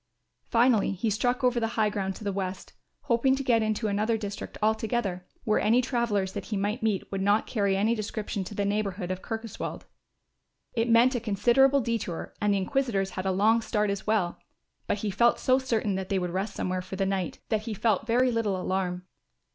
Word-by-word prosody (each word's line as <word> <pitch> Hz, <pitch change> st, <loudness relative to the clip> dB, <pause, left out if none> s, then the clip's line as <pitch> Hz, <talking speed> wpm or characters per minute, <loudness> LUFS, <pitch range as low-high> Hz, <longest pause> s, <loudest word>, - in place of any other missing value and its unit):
Finally 230 Hz, -4 st, +3 dB
he 215 Hz, +4 st, -1 dB
struck 245 Hz, +5 st, 0 dB
over 250 Hz, -1 st, +3 dB
the 225 Hz, -, 0 dB
high 215 Hz, -1 st, +4 dB
ground 195 Hz, -2 st, -2 dB
to -, -, -10 dB
the 200 Hz, -, -1 dB
west, 190 Hz, -1 st, -4 dB, 0.3 s
hoping 265 Hz, -1 st, +2 dB
to 275 Hz, -, -3 dB
get 235 Hz, -3 st, +3 dB
into 215 Hz, 0 st, 0 dB
another 210 Hz, +3 st, +1 dB
district 205 Hz, -2 st, -6 dB
altogether, 215 Hz, -4 st, -1 dB, 0.2 s
where 215 Hz, -, +2 dB
any 225 Hz, +4 st, +4 dB
travellers 235 Hz, -7 st, 0 dB
that -, -, -5 dB
he 210 Hz, -, -3 dB
might 205 Hz, +5 st, -1 dB
meet 215 Hz, -4 st, -1 dB
would 195 Hz, -1 st, -2 dB
not 205 Hz, +2 st, +3 dB
carry 200 Hz, -4 st, 0 dB
any 215 Hz, +4 st, +2 dB
description 215 Hz, -2 st, -3 dB
to 205 Hz, -, -8 dB
the 200 Hz, -, 0 dB
neighbourhood 200 Hz, -3 st, -1 dB
of 185 Hz, 0 st, -4 dB
Kirkoswald. 225 Hz, -2 st, -5 dB, 0.9 s
It 230 Hz, 0 st, 0 dB
meant 235 Hz, +3 st, +5 dB
a 245 Hz, -, 0 dB
considerable 240 Hz, +6 st, +3 dB
detour 230 Hz, -8 st, -3 dB
and 210 Hz, 0 st, +2 dB
the 200 Hz, -, +2 dB
inquisitors 195 Hz, -2 st, 0 dB
had 185 Hz, +1 st, -4 dB
a -, -, +2 dB
long 215 Hz, +5 st, +3 dB
start 210 Hz, -2 st, 0 dB
as 200 Hz, +1 st, -5 dB
well; 205 Hz, -5 st, +1 dB, 0.5 s
but -, -, 0 dB
he 205 Hz, 0 st, -2 dB
felt 235 Hz, +5 st, +3 dB
so 255 Hz, 0 st, +3 dB
certain 225 Hz, -6 st, 0 dB
that 190 Hz, 0 st, -3 dB
they 195 Hz, -, +1 dB
would 180 Hz, -2 st, -2 dB
rest 195 Hz, +3 st, -3 dB
somewhere 185 Hz, 0 st, -2 dB
for 185 Hz, +1 st, -7 dB
the 195 Hz, 0 st, 0 dB
night, 190 Hz, -3 st, -2 dB
that 215 Hz, -1 st, +1 dB
he 220 Hz, -, -2 dB
felt 220 Hz, 0 st, +1 dB
very 250 Hz, +2 st, +3 dB
little 215 Hz, -5 st, 0 dB
alarm. 180 Hz, -1 st, -2 dB
210 Hz, 205 wpm, -27 LUFS, 195-230 Hz, 0.9 s, meant